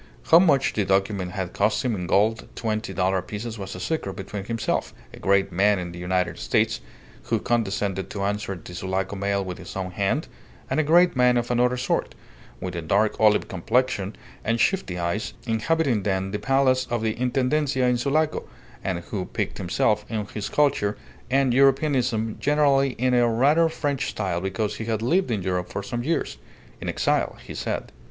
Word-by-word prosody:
How 165 - +10
much 155 -7 +3
the 105 - +1
document 95 -1 0
had 95 -2 -4
cost 105 +5 +1
him 125 - +1
in 90 -4 -3
gold 110 +6 +2
twenty 110 +1 -2
dollar 95 0 +1
pieces 110 +4 -6
was 95 -1 -6
a - - -7
secret 100 - -2
between 95 +1 -6
himself, 115 0 -2 0.2
a - - -11
great 100 0 +2
man 100 +3 +3
in 90 -1 -4
the 85 - -9
United 90 +1 -1
States - - +1 0.4
(who - - +1
condescended 100 -4 -1
to 100 - -4
answer 100 0 -2
the 90 0 -11
Sulaco 95 +2 -2
mail 100 0 -1
with 90 -1 -6
his - - -9
own 95 -1 -3
hand), 100 - 0 0.4
and - - +2
a - - +4
great 175 +3 +5
man 125 -1 +4
of 120 0 -1
another 125 +1 +2
sort, 125 - -1 0.4
with 90 -1 -5
a 85 - -2
dark 100 +6 +2
olive 105 -1 +4
complexion 100 +1 0 0.3
and 115 +1 0
shifty 180 - +1
eyes, 85 +5 -2
inhabiting 125 +1 +1
then 95 -1 -1
the 105 - -2
Palace 135 -1 +2
of 120 -2 -1
the 110 -1 +1
Intendencia 130 +1 +1
in 125 -1 +2
Sulaco, 150 +4 0 0.3
and 90 -3 -2
who 95 -4 -2
piqued - - -3
himself 105 +4 +1
on 110 -2 -2
his 105 -1 -3
culture 135 -9 +2 0.3
and 135 -1 +3
Europeanism 130 -4 +2
generally 140 -2 +3
in 125 +2 0
a 120 -1 +4
rather 145 +8 +4
French 145 -4 -2
style 90 -5 -2
because 95 +3 -2
he 110 - -5
had 110 -1 -1
lived 180 +8 +2
in 105 -5 -1
Europe 90 -1 -1
for 100 - -4
some 120 +4 -3
years 165 +5 -1 0.4
in - - -3
exile, - - 0
he - - -7
said. - - -3
110 Hz, 185 wpm, -24 LUFS, 95-130 Hz, 0.4 s, How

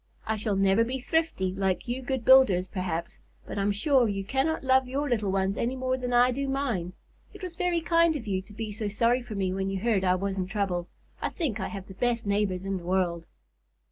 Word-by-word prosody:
I 220 0 0
shall 215 -1 -1
never 195 +3 +4
be 250 +3 -2
thrifty 260 - 0
like 190 +1 -1
you 245 +2 -2
good 260 -2 -3
builders, 225 -9 +6
perhaps, 180 -4 -4 0.3
but - - -5
I'm 200 +1 +2
sure 245 +4 +3
you 195 -1 -2
cannot 270 +10 0
love 260 0 +3
your 280 +3 -2
little 215 -6 0
ones 195 +1 0
any 245 +3 -1
more 255 0 0
than 250 -1 -4
I 245 +1 +5
do 275 +2 -2
mine. 245 -11 -2 0.4
It - - -11
was 360 -2 -5
very 355 -2 0
kind 335 -1 +3
of 265 - -5
you 190 -3 -1
to 200 +2 -16
be 220 0 -5
so 210 0 -4
sorry 230 +4 +2
for 235 -3 -8
me 190 -2 -1
when 190 0 -2
you 195 0 -2
heard 210 -2 +1
I 180 -1 +3
was 195 +1 -2
in 185 - -1
trouble. 190 -4 -2 0.3
I - - 0
think 270 - -2
I - - -2
have 195 -3 -7
the 190 - -11
best 235 +3 -1
neighbors 200 -2 0
in 195 0 -1
the 175 - -9
world." 175 -2 0
215 Hz, 235 wpm, -27 LUFS, 190-260 Hz, 0.4 s, builders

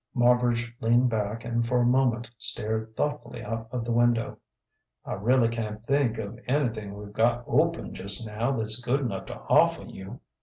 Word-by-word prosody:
Marbridge 120 -1 +2
leaned 120 +2 +3
back 110 +1 -2
and 120 0 0
for 120 +2 0
a 120 - +3
moment 120 -2 +2
stared 110 +1 -1
thoughtfully 150 0 -3
out 115 +1 -4
of 120 -2 -3
the 120 - -2
window. 120 0 +2 0.7
"I - - -4
really 115 +4 +3
can't 110 -1 -4
think 135 -4 +1
of 110 +2 -6
anything 115 -7 -1
we've 105 0 -10
got 120 +3 +2
open 165 +6 +1
just 100 +3 +1
now 110 +4 -1
that's 110 -1 -1
good 125 +4 0
enough 105 -8 -3
to - - -7
offer - - +3
you." 95 0 -9
115 Hz, 175 wpm, -27 LUFS, 110-125 Hz, 0.7 s, leaned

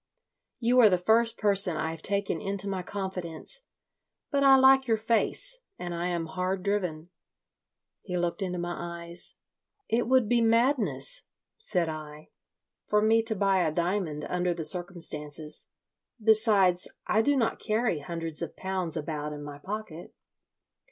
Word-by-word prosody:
You 245 +1 +3
are 225 -4 +7
the 180 - +2
first 225 +5 +2
person 195 -5 +5
I 160 - -2
have 165 -1 -9
taken 200 -4 -1
into 200 0 -3
my 190 -2 -3
confidence. 190 - -5 0.7
But 280 -1 +1
I 270 -1 +7
like 265 0 +5
your 225 -1 +2
face 235 - +3 0.2
and 175 -1 -5
I 170 +1 -3
am 170 -2 -2
hard 185 +3 -3
driven." 180 -5 -2 0.9
He 180 -3 -4
looked 175 +3 -2
into 180 -2 -3
my 175 0 -5
eyes. 170 +1 -4 0.5
"It 230 +1 0
would 255 -3 +3
be 240 +1 +2
madness," 240 - +2 0.3
said 180 - +1
I, 155 -1 -8 0.6
"for 210 0 +2
me 225 +1 +4
to 225 -1 -1
buy 195 -1 +2
a 155 - 0
diamond 170 -3 -2
under 180 -1 -1
the 165 - -4
circumstances. 155 -3 -1 0.5
Besides, 210 -5 +3 0.2
I 220 - +2
do 285 +5 +2
not 230 -3 0
carry 215 -6 -1
hundreds 165 0 -4
of 170 - -5
pounds 185 -4 -3
about 150 -1 -4
in 145 0 -8
my 145 -1 -9
pocket. 190 -2 -7
185 Hz, 150 wpm, -27 LUFS, 170-220 Hz, 0.9 s, are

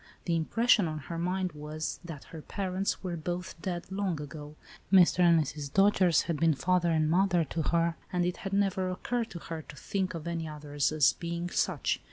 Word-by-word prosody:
The 170 - +1
impression 210 +4 +3
on 155 -1 -3
her 165 +3 -6
mind 180 +1 -1
was, 150 +1 -5
that 165 -4 -8
her 160 - -7
parents 190 +3 -2
were 180 -2 -2
both 175 +3 -4
dead 175 0 -4
long 190 -5 -1
ago. 150 0 -8 0.4
Mr. 185 -2 +6
and 170 -2 +6
Mrs. 145 -1 -3
Dojere 195 -3 +4
had 165 -3 -2
been 165 -1 +3
father 180 +3 +2
and 160 -2 +2
mother 175 +1 +3
to 160 +2 -3
her, 170 +1 +1
and 180 -2 +1
it 180 0 -1
had 195 - -5
never 195 -2 +1
occurred 230 +5 -2
to - - -7
her 165 -1 -6
to 150 - -12
think 185 +5 -2
of 165 -1 -6
any 165 -1 -2
others 150 -1 -1
as 145 -7 +4
being 170 +1 -4
such. - - 0
170 Hz, 200 wpm, -30 LUFS, 155-185 Hz, 0.4 s, Mr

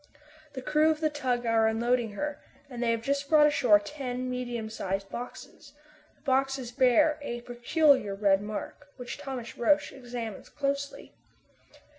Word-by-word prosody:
The 260 -2 -6
crew 305 +3 +3
of 310 -1 +1
the 310 -1 +1
tug 255 -4 -1
are 225 -1 +3
unloading 230 0 +1
her, 295 +7 -4 0.3
and 245 -1 -6
they 240 - +1
have 230 -1 0
just 280 +2 -1
brought 305 -2 +7
ashore 255 -8 +5
ten 255 +2 -5
medium 240 -3 -3
sized 195 -2 -4
boxes. 250 +3 -9 0.4
These - - -33
boxes 270 -2 0
bear 260 +4 +4
a 240 -4 -5
peculiar 245 -2 +2
red 195 -1 +3
mark, 215 +7 -6
which 245 -2 -7
Thomas 255 -4 -6
Roch 295 +5 +3
examines 240 -5 -7
closely. 280 0 -3
250 Hz, 150 wpm, -28 LUFS, 230-280 Hz, 0.4 s, brought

